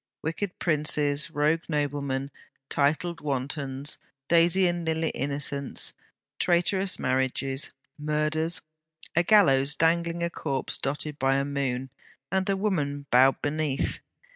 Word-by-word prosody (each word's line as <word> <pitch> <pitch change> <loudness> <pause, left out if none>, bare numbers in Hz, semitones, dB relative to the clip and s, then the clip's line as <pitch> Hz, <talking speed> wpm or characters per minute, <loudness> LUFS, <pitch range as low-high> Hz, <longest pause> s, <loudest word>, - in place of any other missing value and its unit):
wicked 180 +4 -3
princes, 150 -2 +2
rogue 155 +1 +1
noblemen, 140 -2 -1 0.4
titled 155 +4 0
wantons, 140 0 -2 0.3
daisy 170 +2 +4
and 175 -1 0
lily 160 0 0
innocents, 140 0 -1 0.5
traitorous 185 +2 +2
marriages, 130 +1 -1 0.3
murders, 155 +2 0 0.5
a 175 - +5
gallows 150 -9 +5
dangling 170 +1 +1
a 170 - 0
corpse 135 -6 -3
dotted 145 +2 -3
by 135 0 +2
a 140 0 +1
moon, 135 -2 -2 0.4
and 190 +1 0
a 195 - +2
woman 145 -9 -1
bowed 130 +2 +5
beneath. 145 -2 +1
150 Hz, 115 wpm, -27 LUFS, 140-170 Hz, 0.5 s, a